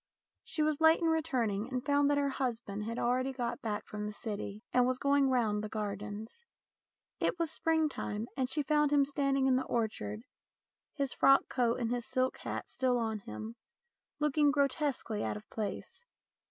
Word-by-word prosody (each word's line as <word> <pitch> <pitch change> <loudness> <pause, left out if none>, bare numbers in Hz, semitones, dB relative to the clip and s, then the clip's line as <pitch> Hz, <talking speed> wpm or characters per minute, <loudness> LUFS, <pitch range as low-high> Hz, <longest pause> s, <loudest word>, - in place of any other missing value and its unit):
She 310 - -2
was 305 0 0
late 320 0 +6
in 335 - -1
returning, 250 -10 0
and 255 -1 -3
found 285 0 +3
that 290 - +3
her 285 -1 +2
husband 230 -6 -3
had 230 +1 -4
already 255 +2 +1
got 245 -2 -3
back 210 -2 -3
from 210 0 -5
the - - -4
City 210 -1 -5
and 250 0 +4
was 255 0 +1
going 280 0 +3
round 220 -5 +1
the 215 - -4
gardens. 210 - -5 0.8
It - - +1
was 330 -2 -1
springtime, 310 -10 0
and 260 -2 0
she 300 +1 -1
found 295 +1 +3
him 285 -1 +5
standing 275 -1 +1
in 260 -1 +4
the 260 - -1
orchard, 220 -2 -2 0.7
his 280 -3 -1
frock 275 0 +5
coat 240 -2 +1
and 235 -1 -1
his 245 -1 -2
silk 255 0 0
hat - - -5
still 255 -2 +1
on 220 -2 -1
him, 200 - -7 0.6
looking 300 0 +3
grotesquely 280 -6 0
out - - -2
of 210 - -13
place. 225 - -5
255 Hz, 180 wpm, -32 LUFS, 220-285 Hz, 0.8 s, late